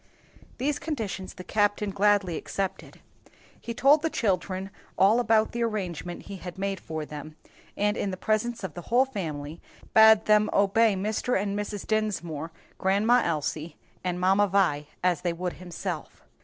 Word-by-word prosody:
These 290 +2 -1
conditions 220 - -4
the 185 - -8
captain 205 0 +1
gladly 200 -3 +2
accepted. 195 +3 -4 0.6
He 235 - -5
told 285 +5 +5
the 320 - 0
children 190 - -1 0.3
all 205 +5 +5
about 220 -2 +3
the 235 - -3
arrangement 180 -6 -3
he 200 - -8
had 180 -1 -8
made 195 -1 -2
for 160 -2 -5
them, 150 +1 -9 0.4
and 210 +1 +1
in 200 - -2
the 185 - -4
presence 220 +3 -1
of 185 -5 -4
the 175 - -7
whole 250 +3 +5
family, 160 - -5 0.3
bade 220 -1 +7
them 210 0 +4
obey 205 +2 +4
Mr. 215 +4 0
and 200 0 -2
Mrs. 205 -1 -4
Dinsmore, 170 -8 -2 0.3
Grandma 210 +6 +3
Elsie 155 0 -2 0.3
and 180 -1 -2
Mamma 195 +3 +4
Vi 175 -7 +1 0.2
as 180 -4 +2
they 175 -2 -1
would 180 +1 -3
himself. 175 -2 -6
195 Hz, 155 wpm, -27 LUFS, 175-215 Hz, 0.6 s, bade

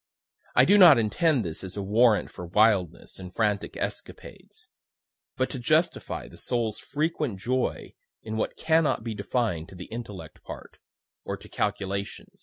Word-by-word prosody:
(I - - +7
do 205 +1 +6
not 170 -8 +9
intend 125 - +2
this 80 +2 -4
as 95 +1 -7
a 100 - -2
warrant 110 +2 +3
for 90 - -8
wildness 100 -2 +2
and 90 -1 -8
frantic 105 0 -1
escapades - - -7 0.7
but 130 - +1
to 130 - -5
justify 155 - 0
the - - -14
soul's 115 -3 -2
frequent 150 - -2
joy 125 +5 -2 0.3
in 110 0 -5
what 110 - -2
cannot 160 -6 +2
be 115 -1 -3
defined 100 -5 -2
to - - -12
the 90 0 -8
intellectual 110 -4 -8
part, - - -10 0.4
or - - -4
to - - -14
calculation.) 100 -1 -3
110 Hz, 155 wpm, -27 LUFS, 100-130 Hz, 0.7 s, not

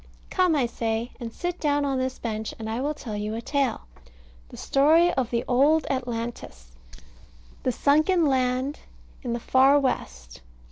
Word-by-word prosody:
Come, 365 -4 +3
I 275 -4 +2
say, 230 0 -2
and 235 -2 -6
sit 355 +7 -4
down 290 -1 +1
on 270 -2 0
this 260 0 -2
bench, 220 -2 -4
and 220 - -6
I 225 +3 -2
will 295 +2 -1
tell 220 -6 -6
you 210 +1 -3
a - - -3
tale, 275 -5 0 0.7
the - - -11
story 320 +5 +4
of 255 -4 -1
the 235 0 -1
Old 285 +6 +3
Atlantis, 235 - -5 0.9
the 255 - 0
sunken 310 +7 +3
land 260 +1 0 0.4
in 245 -3 -3
the 235 - -2
far 265 +4 +4
West. - - -4
255 Hz, 160 wpm, -25 LUFS, 230-285 Hz, 0.9 s, story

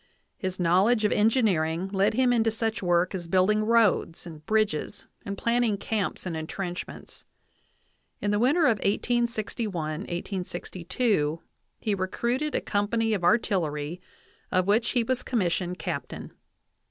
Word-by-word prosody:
His 185 -1 -4
knowledge 195 +6 +3
of 210 - +2
engineering 190 -7 +2
led 195 +2 +1
him 250 0 +3
into 225 -1 +3
such 225 0 -2
work 175 0 +2
as 175 -3 -5
building 190 +5 +3
roads 220 -7 +2
and 155 -3 -10
bridges 215 -3 0 0.2
and 200 0 -4
planning 235 -2 +1
camps 200 -2 -2
and 175 -3 -3
entrenchments. 175 +3 -6 1.0
In 205 - -1
the 205 - +1
winter 275 +9 +3
of 225 -5 +3
1861 215 -6 -1
1862 175 -1 -2 0.4
he 215 - -1
recruited 235 +10 -1
a - - +1
company 220 +2 0
of 195 -4 -2
artillery, 175 -6 +1 0.5
of 185 0 +2
which 220 +4 +2
he 245 -3 +2
was 255 +1 -1
commissioned 180 -5 -1
captain. 170 -8 -5
200 Hz, 130 wpm, -27 LUFS, 175-225 Hz, 1.0 s, knowledge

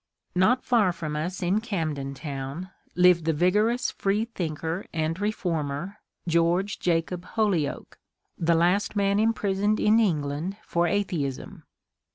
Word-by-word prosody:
Not 215 +8 +3
far 220 -7 +3
from 160 -3 -5
us 175 +5 -3
in 190 +5 +1
Camden 155 - -3
Town 140 +5 -6 0.2
lived 180 -2 +5
the 160 - +2
vigorous 210 +9 +2
free 205 +3 0
thinker 165 -4 -4
and 160 +1 -2
reformer, 175 -3 -2 0.3
George 170 +5 +1
Jacob 170 +1 0
Holyoake, 195 -10 -1 0.4
the 170 0 +2
last 180 +6 +2
man 200 0 +2
imprisoned 210 -2 +1
in 215 +2 +4
England 160 -1 -1
for 170 0 +1
atheism. 170 -8 -2
180 Hz, 125 wpm, -26 LUFS, 160-205 Hz, 0.4 s, lived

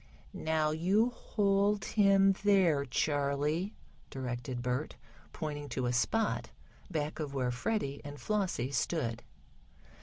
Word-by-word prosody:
"Now 155 -1 0
you 195 +9 +2
hold 200 -2 +1
him 195 -2 +5
there, 180 -9 +4
Charley," 145 - 0 0.3
directed 125 -1 -4
Bert, 125 +4 -2 0.4
pointing 145 -3 -5
to 130 - -2
a 120 - 0
spot 215 - +1 0.4
back 155 -3 -2
of 145 -3 -4
where 125 -2 0
Freddie 140 - -2
and 145 0 -8
Flossie 190 - -1
stood. 120 -4 -1
155 Hz, 115 wpm, -32 LUFS, 135-195 Hz, 0.4 s, him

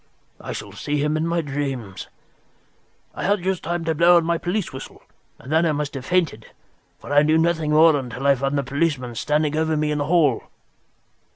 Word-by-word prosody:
I - - -7
shall - - -7
see 150 0 -3
him 150 +1 0
in 155 +1 -1
my 170 0 0
dreams. 135 - -5 1.1
I - - -6
had 200 -2 +1
just 190 -1 -1
time 175 0 -3
to 160 - +1
blow 170 +3 +5
on 170 - +1
my 170 0 0
police 180 -1 -2
whistle, 130 - -10 0.3
and 130 - -11
then 160 +2 +3
I 160 -2 +2
must 145 0 -3
have 130 -2 -7
fainted, 165 -12 0 0.5
for 145 - -7
I 145 - +6
knew 155 +1 +3
nothing 160 -1 +1
more 155 +1 +6
until 130 -1 -5
I 140 - +6
found 135 +2 -1
the 140 - 0
policeman 135 -2 -1
standing 150 +5 0
over 160 0 0
me 150 0 0
in 150 - -1
the 145 - -1
hall." 150 -6 +2
150 Hz, 205 wpm, -22 LUFS, 140-165 Hz, 1.1 s, I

